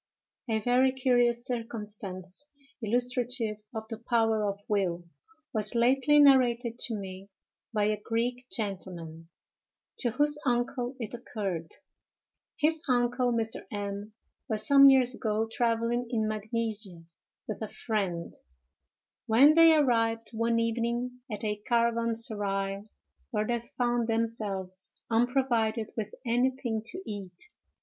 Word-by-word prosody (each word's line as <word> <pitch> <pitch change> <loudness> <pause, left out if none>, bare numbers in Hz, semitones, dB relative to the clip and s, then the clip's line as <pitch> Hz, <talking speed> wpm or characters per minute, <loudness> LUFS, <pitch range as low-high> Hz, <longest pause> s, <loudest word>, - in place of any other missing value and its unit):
A 220 - +2
VERY 250 +4 +3
curious 245 -2 +2
circumstance, 210 -1 -6 0.3
illustrative 245 -1 0
of 220 -1 -6
the 225 -1 -6
power 225 -2 +1
of 200 0 -5
will, 185 -4 0 0.5
was 215 0 +1
lately 270 +5 +4
narrated 245 -4 +4
to 230 - +1
me 195 -1 -8 0.4
by 210 -2 0
a 210 0 0
Greek 245 +2 -2
gentleman, 175 -6 -5 0.7
to 245 - +1
whose 295 +5 +2
uncle 245 0 -1
it 230 -2 -5
occurred. 195 -9 -5 0.8
His 315 +1 +2
uncle, 245 0 +2
Mr. 225 -4 -2
M——, 205 +1 -5 0.4
was 215 -1 +3
some 275 +1 +8
years 260 -2 +4
ago 220 -2 -1
travelling 230 +1 0
in 220 -3 0
Magnesia 215 -4 -3 0.4
with 215 - -5
a 220 - -2
friend, 195 -7 -3 0.9
when 265 +7 +7
they 330 0 +7
arrived 230 -5 +1
one 230 +1 +1
evening 235 +2 -1
at 210 0 -5
a 210 -1 -1
caravanserai, 225 -4 0 0.4
where 215 -4 -1
they 240 +1 0 0.2
found 240 -2 +1
themselves 210 -5 -3 0.2
unprovided 230 -2 +1
with 215 -2 -4
anything 245 -1 0
to 370 +10 -4
eat. 195 -4 -7
230 Hz, 120 wpm, -29 LUFS, 210-245 Hz, 0.9 s, some